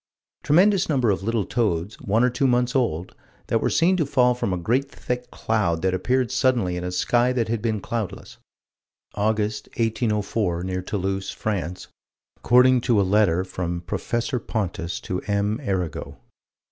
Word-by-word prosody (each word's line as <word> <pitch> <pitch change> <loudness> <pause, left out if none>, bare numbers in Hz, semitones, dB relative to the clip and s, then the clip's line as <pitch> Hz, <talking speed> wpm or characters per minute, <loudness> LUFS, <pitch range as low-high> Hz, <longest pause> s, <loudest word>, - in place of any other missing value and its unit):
Tremendous 190 +4 +3
number 130 -7 +2
of 95 - -1
little 110 0 -1
toads, 105 -5 -1
one 110 +4 +2
or 125 - +3
two 135 +2 +1
months 125 0 +1
old, 95 -9 0 0.3
that - - 0
were - - +1
seen 175 +3 +3
to 160 - +1
fall 125 -3 +3
from 120 -5 -2
a 90 - 0
great 125 +10 0
thick 125 -2 -5
cloud 100 -10 -1
that 95 -1 +2
appeared 125 +7 0
suddenly 125 -9 +1
in 90 - -4
a 90 - -3
sky 120 +6 +2
that 115 -3 -1
had 115 -1 -1
been 110 -2 -1
cloudless, 110 -1 -5 0.8
August, 105 0 -1
1804, 105 -5 0
near 95 0 -2
Toulouse, 95 0 -3
France, 90 -4 -3 0.5
according 125 +1 +5
to 115 -4 +2
a - - +4
letter 95 -3 +3
from 85 -2 -4
Prof. 120 +8 -3
Pontus 90 -6 -3
to 90 0 -3
M. 105 +2 0
Arago. 90 - -3
110 Hz, 160 wpm, -24 LUFS, 95-125 Hz, 0.8 s, according